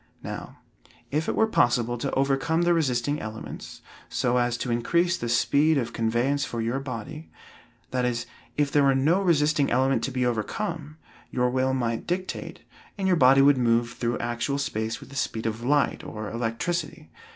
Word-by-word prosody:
Now, - - -7 0.5
if 155 +3 0
it - - 0
were 220 - +4
possible 120 - +2
to 140 - -2
overcome 135 +5 +1
the 175 0 +4
resisting 145 -2 0
elements, 110 +1 -8 0.3
so 125 0 +1
as 120 -1 +1
to 125 - -3
increase 170 +9 +2
the 120 -8 -4
speed 145 +6 +3
of 120 -3 -2
conveyance 120 +5 +1
for 120 - -4
your 115 +4 -1
body 135 +4 -7 0.6
that 125 -1 0
is, 120 -1 -1 0.3
if 145 -1 +1
there 145 - +4
were 135 -1 +4
no 155 +8 +3
resisting 150 -5 +2
element 130 +2 +2
to 135 - -4
be 125 -1 0
overcome, 150 - -3 0.3
your 125 0 +1
will 130 +1 +1
might 115 -3 -2
dictate, 185 +2 -4 0.4
and 195 -1 -1
your 185 - +4
body 135 -2 +6
would 140 -1 +5
move 120 0 +2
through 120 -1 -2
actual 120 +4 -2
space 110 -4 -2
with - - -12
the 140 - -11
speed 115 -3 -2
of 115 +1 -3
light, 145 +3 +1
or 105 -1 -6
electricity. 115 +9 -3
130 Hz, 175 wpm, -26 LUFS, 120-150 Hz, 0.6 s, body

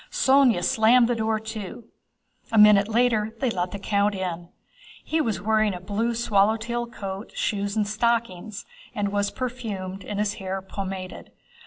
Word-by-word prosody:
Sónya 260 -8 +3
slammed 230 +4 +4
the 245 - +1
door 220 -1 0
to. 220 0 -7 0.7
A 225 - +1
minute 210 -1 +7
later 225 -1 +1
they 260 -3 0
let 180 -3 -2
the 200 - -6
count 200 +1 0
in. 175 -2 -4 0.5
He 320 0 0
was 220 - -1
wearing 215 -2 +2
a - - -6
blue 210 +5 -2
swallow 220 -2 +2
tail 235 +1 -3
coat, 195 -3 -7
shoes 200 0 -1
and 210 -2 +1
stockings, 215 -2 -1 0.3
and 205 -1 -1
was 205 0 0
perfumed 205 -7 -5
and 205 - -5
his 210 0 0
hair 190 0 -3
pomaded. 190 -1 -6
210 Hz, 160 wpm, -25 LUFS, 195-230 Hz, 0.7 s, minute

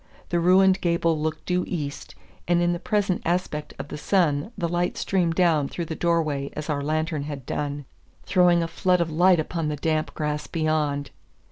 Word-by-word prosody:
The 175 - +1
ruined 185 +2 +4
gable 170 -2 +1
looked 155 0 -3
due 180 0 +1
east, 145 -5 -5 0.3
and 175 0 +3
in 175 0 +2
the 175 - -3
present 200 -1 0
aspect 170 -3 -2
of 135 +1 -7
the - - -6
sun 165 0 +1
the 175 -3 -1
light 175 +1 -1
streamed 175 -4 0
down 165 -6 +3
through 170 - -4
the 160 - -5
door 170 0 +2
way 140 -2 -3
as 150 +1 -4
our 145 -1 -1
lantern 155 +1 -1
had 145 -4 -6
done, 145 -1 -3 0.4
throwing 175 -2 +4
a - - -2
flood 180 +2 +1
of 170 -1 0
light 175 +2 +4
upon 160 0 -2
the 150 - -1
damp 155 +1 -1
grass 150 -1 -2
beyond. 150 -4 -1
165 Hz, 195 wpm, -25 LUFS, 150-175 Hz, 0.4 s, ruined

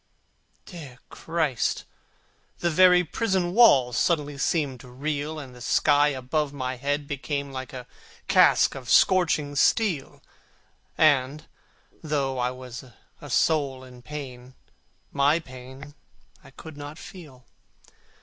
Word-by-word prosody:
Dear 150 -9 -11
Christ! 160 -7 -2 0.7
the 170 - -1
very 180 +1 +5
prison 185 -1 -1
walls 135 - +5
Suddenly 145 -4 0
seemed 140 -4 -1
to 125 - -14
reel, 145 +4 -4
And 135 -4 -9
the 125 - -14
sky 145 +3 +3
above 140 +2 -2
my 130 -2 -4
head 145 +3 -2
became 140 0 -4
Like 130 -1 -7
a 125 -2 -8 0.4
casque - - +4
of 130 -4 -9
scorching 155 -6 +3
steel; 175 -1 0 0.7
And, 145 -1 +2 0.6
though 140 -4 -2
I 125 0 0
was 125 0 -9 0.4
a - - -10
soul 140 -5 +1
in 125 -1 -14
pain, 130 -3 -9 0.6
My 140 +3 +3
pain 130 -1 -11 0.5
I - - -15
could 160 -2 -12
not 145 +2 -8
feel. 160 - -13
145 Hz, 120 wpm, -25 LUFS, 130-155 Hz, 0.7 s, very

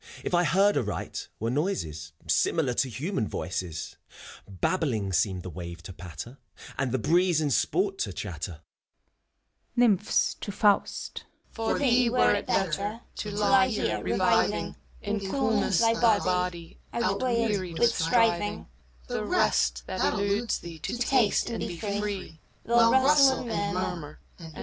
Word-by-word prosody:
If - - -4
I 175 0 +4
heard 195 +6 +3
aright, 105 -4 -3
were 115 +2 -1
noises 80 - -2 0.2
Similar 145 -7 +2
to 130 +2 0
human 130 - -2
voices. 90 -5 -5 0.5
Babbling 110 - -1
seemed 95 -1 +1
the 90 - -6
wave 85 -1 -8
to 95 - -8
patter, 90 - -9 0.4
And 130 -2 -1
the 130 - +1
breeze 175 +6 +2
in 150 -2 0
sport 390 - +1
to - - -1
chatter. - - -6 1.2
NYMPHS 215 -5 +2
{to 205 - -5
Faust). 205 0 0 0.3
For 225 -1 -1
thee 250 -3 +3
were 250 +2 +3
it - - -2
better 200 +5 -1 0.2
To 210 - -4
lie 210 +6 +3
here, 225 -4 -1
reviving - - +1 0.3
In 210 0 -1
coolness 205 -2 +1
thy 225 0 +4
body, 180 -7 0
Outwearied 230 -7 0
with 235 +4 +4
striving, 205 +3 +1 0.2
— 60 0 -29
The - - -3
rest, - - +1
that - - -4
eludes 200 +3 0
thee. 170 -2 -10
To 240 - -4
taste, 240 -4 +2
and 230 - -3
be 175 - -4
free: 200 -4 -4 0.3
Well 230 0 +5
rustle 265 0 +4
and 200 -2 -1
murmur. 165 -5 -4
190 Hz, 140 wpm, -27 LUFS, -, 1.2 s, Well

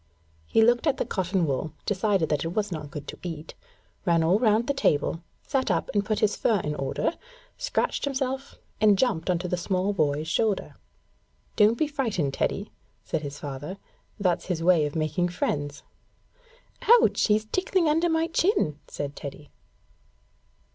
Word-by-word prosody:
He 225 - +4
looked 240 +6 +3
at 280 -3 +2
the - - -1
cotton 185 -2 0
wool, 145 +2 -2
decided 195 -4 +1
that 150 -2 0
it - - -2
was 210 -2 0
not 150 -3 -5
good 145 0 -8
to - - -8
eat, 160 -3 -6 0.5
ran 170 -2 +3
all 180 +6 +3
round 225 -1 +3
the 280 - 0
table, 165 - +1 0.2
sat 265 -4 0
up 170 -3 0
and 205 -1 +2
put 215 +1 -1
his 210 -1 +3
fur 220 -4 +2
in 150 - -2
order, 135 - -1 0.5
scratched - - -1
himself, 270 0 -3 0.3
and 210 -2 +6
jumped 200 -8 +1
on 180 - +3
the 180 0 -2
small 185 +2 0
boy's 155 -3 0
shoulder. 205 +5 0 0.8
'Don't 215 +1 +5
be 310 - +2
frightened, 230 - -1
Teddy,' - - -2 0.3
said - - -2
his 145 -1 -6
father. 145 +6 -6 0.4
'That's 180 -4 +1
his 170 -3 -2
way 170 -4 +4
of 145 - -8
making 160 +3 0
friends.' 145 -4 -2 1.0
'Ouch! 470 +1 +5
He's 215 0 +2
tickling 370 - +1
under 325 +3 +2
my 325 0 +2
chin,' 330 - +1
said 145 0 -5
Teddy. 145 0 -9
185 Hz, 165 wpm, -26 LUFS, 155-235 Hz, 1.0 s, and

